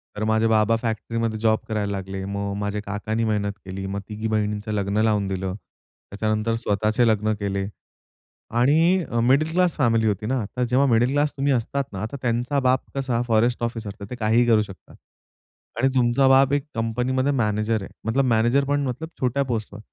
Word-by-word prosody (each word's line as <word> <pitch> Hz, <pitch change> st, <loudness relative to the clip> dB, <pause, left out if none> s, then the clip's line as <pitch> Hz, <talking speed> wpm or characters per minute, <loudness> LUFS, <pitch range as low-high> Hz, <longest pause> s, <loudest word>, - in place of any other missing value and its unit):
तर 105 Hz, -, -3 dB
माझे 110 Hz, +1 st, +2 dB
बाबा 110 Hz, 0 st, +3 dB
फॅक्टरीमध्ये 115 Hz, 0 st, -2 dB
जॉब 110 Hz, 0 st, +2 dB
करायला 105 Hz, -2 st, -2 dB
लागले. 95 Hz, 0 st, -4 dB
मग 100 Hz, 0 st, -3 dB
माझ्या 105 Hz, 0 st, -2 dB
काकांनी 105 Hz, +3 st, -2 dB
मेहनत 105 Hz, -2 st, 0 dB
केली, 95 Hz, +1 st, -6 dB
मग 100 Hz, +1 st, -3 dB
तिघी 110 Hz, +1 st, -4 dB
बहिणींचं 105 Hz, -1 st, -1 dB
लग्न 100 Hz, 0 st, 0 dB
लावून 105 Hz, -3 st, +1 dB
दिलं. 95 Hz, -1 st, -3 dB, 0.6 s
त्याच्यानंतर 110 Hz, +2 st, -1 dB
स्वतःचे 110 Hz, +1 st, +1 dB
लग्न 110 Hz, -1 st, +2 dB
केले 100 Hz, -1 st, -2 dB, 0.9 s
आणि 165 Hz, +7 st, +4 dB
अ, 115 Hz, -, 0 dB
मिडल 135 Hz, +7 st, +3 dB
क्लास 180 Hz, 0 st, +2 dB
फॅमिली 115 Hz, -5 st, +2 dB
होती 105 Hz, 0 st, -1 dB
ना. 130 Hz, +3 st, 0 dB
आता 125 Hz, +5 st, -3 dB
जेव्हा 130 Hz, +3 st, +2 dB
मिडल 120 Hz, +2 st, +3 dB
क्लास 145 Hz, +1 st, +1 dB
तुम्ही 140 Hz, +1 st, +2 dB
असतात 130 Hz, +3 st, -1 dB
ना. 95 Hz, -, -5 dB
आता 110 Hz, +6 st, -4 dB
त्यांचा 125 Hz, +3 st, 0 dB
बाप 130 Hz, -1 st, +2 dB
कसा 130 Hz, -4 st, 0 dB
फॉरेस्ट 120 Hz, +1 st, +2 dB
ऑफिसर 115 Hz, -3 st, -3 dB
तर 100 Hz, -, -6 dB
ते 125 Hz, -, -5 dB
काहीही 115 Hz, +1 st, +2 dB
करू 110 Hz, -2 st, +5 dB
शकतात 95 Hz, -3 st, -10 dB, 0.8 s
आणि 135 Hz, -, +3 dB
तुमचा 125 Hz, +2 st, +3 dB
बाप 135 Hz, +1 st, +5 dB
एक 145 Hz, 0 st, 0 dB
कंपनीमध्ये 125 Hz, +4 st, 0 dB
मॅनेजर 110 Hz, -3 st, 0 dB
आहे. -, -, -9 dB, 0.2 s
मतलब 130 Hz, +5 st, +1 dB
मॅनेजर 120 Hz, +3 st, +3 dB
पण 145 Hz, +1 st, 0 dB
मतलब 155 Hz, +6 st, -5 dB
छोट्या 130 Hz, +2 st, +1 dB
पोस्टवर 110 Hz, -5 st, -4 dB
115 Hz, 180 wpm, -23 LUFS, 105-130 Hz, 0.9 s, करू